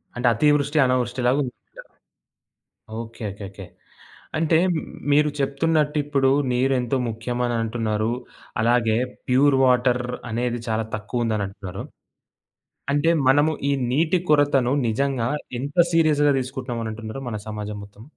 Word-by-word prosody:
అంటే 125 0 0
అతీవృష్టి, 145 +3 +2
అనావృష్టి‌లాగుందంటారు. 125 +1 0 1.4
ఓకే. 115 0 -10
ఓకేకే. 100 -1 -9 0.7
అంటే 160 0 +3 0.6
మీరు 150 +1 +4
చెప్తున్నట్టు 150 +2 +1
ఇప్పుడు 135 -2 +2 0.2
నీరు 130 +2 +2
ఎంతో 125 +2 -1
ముఖ్యమనంటున్నారు. 115 -1 -1 0.5
అలాగే 115 -1 +2 0.3
ప్యూర్ 135 +2 +4
వాటర్ 125 -1 +3 0.3
అనేది 120 +1 -1
చాలా 110 0 0
తక్కువందనుంటున్నారు. 105 -3 -3 1.1
అంటే 145 +3 +2 0.2
మనము 145 +4 +4 0.2
ఈ - - +3 0.2
నీటి 165 +6 +2
కొరతను 140 -4 +3 0.2
నిజంగా 125 +1 0 0.3
ఎంత 145 +5 -6 0.2
సీరియస్‌గా 150 -3 +4
దీసుకుంటున్నామనంటున్నరు 120 -2 -5
మన 105 -2 -4
సమాజం 105 -1 -5
మొత్తం? 105 +3 -16
125 Hz, 100 wpm, -23 LUFS, 115-145 Hz, 1.4 s, మీరు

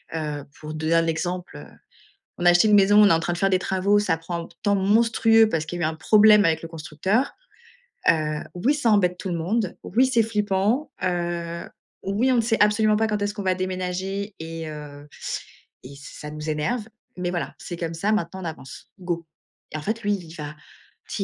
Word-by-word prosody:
heu, 150 -2 -3 0.2
pour 155 0 -7
donner 155 +1 0
un 165 0 +4
exemple, 175 +2 -3
heu, - - -10 0.7
on 175 - -1
a - - +9
acheté 175 +5 +5
une 210 - +5
maison, 205 +1 +6
on 205 - +7
est - - +5
en 165 - +3
train 175 +1 -2
de - - -6
faire 195 +2 +2
des 185 - +3
travaux, 195 +2 +2
ça 205 -5 +1
prend 170 +1 -5
p - - -21
temps 205 -1 +2
monstrueux 225 +2 +4
parce 160 -6 -2
qu'il 175 +2 -5
y - - +1
a - - +3
eu - - +1
un - - -7
problème 210 +5 +6
avec 160 -1 +1
le 165 - -6
constructeur. 165 - -1 0.8
Heu, 155 -2 +1 0.2
oui 235 +11 +2
ça 285 -6 +1
embête 180 -4 +3
tout - - -5
le 175 - -1
monde. 190 +4 -1
Oui, 255 +3 +2
c'est 235 -3 +3
flippant, 210 +5 0
heu. 170 -1 -2 0.3
Oui, 210 +7 +1
on 250 - +3
ne - - +4
sait 225 0 +1
absolument 210 +1 +4
pas 220 +1 +2
quand 210 -1 -2
est-ce 205 0 -1
qu'on 205 - -5
va 185 -1 +1
déménager 185 +2 -3
et 165 0 -6
heu, 145 -1 -9 0.8
et 130 - -10
ç - - -13 0.2
ça 150 - -7
nous 150 +1 -5
énerve 180 +10 -1 0.3
mais 180 -1 -1
voilà, 170 -6 -3
c'est 175 - -7
comme 165 -1 -3
ça. 195 +6 0
Maintenant 190 -3 -2
on - - -6
avance. 150 -5 -9
Go, 175 -2 -3 0.5
et - - -3
en - - -7
fait 220 +6 -3
lui, 205 0 +1
il 170 -4 -8
va, 150 -1 -6 0.5
tu - - -6
180 Hz, 225 wpm, -24 LUFS, 165-210 Hz, 0.8 s, a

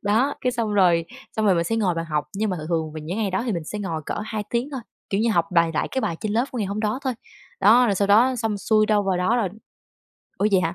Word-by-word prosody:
Đó, 230 +8 +2
cái 250 -1 0
xong 230 -3 -1
rồi 175 -4 +4 0.3
xong 220 -1 +1
rồi 190 - +5
mình 170 0 +1
sẽ 225 +6 -1
ngồi 190 -6 +1
vào 165 0 -3
học, 150 -2 -1
nhưng 210 +1 -1
mà 185 - -2
thường 155 0 -7
thường 160 -2 -1
vào 155 - -6
những 170 +7 -5
ngày 205 -3 0
đó 190 - -1
thì 225 - 0
mình 170 -3 -3
sẽ 210 - -5
ngồi 165 -6 -3
cỡ - - -2
2 215 -1 -3
tiếng 245 +5 -1
thôi, 265 -3 -4 0.3
kiểu 200 +1 +1
như, 230 0 +2
học 170 -3 +2
bài 170 -1 +4
lại - - 0
cái 265 - -1
bài 165 -9 -2
trên 210 -1 -2
lớp 235 +3 +2
của 250 - -5
ngày 205 - -1
hôm 205 +2 -3
đó 215 +4 -1
thôi. 260 - 0 0.5
Đó, 235 +5 +6
rồi 205 - +2
sau 200 +1 0
đó 245 +5 +5
xong 220 -3 -2
xuôi 215 +1 +2
đâu 210 -1 +3
vào 190 -2 0
đó 185 +7 +1
rồi 220 -6 +1 0.9
ủa 205 - +2
vậy 190 - +5
hả? 165 0 -1
205 Hz, 300 wpm, -23 LUFS, 175-225 Hz, 0.9 s, Đó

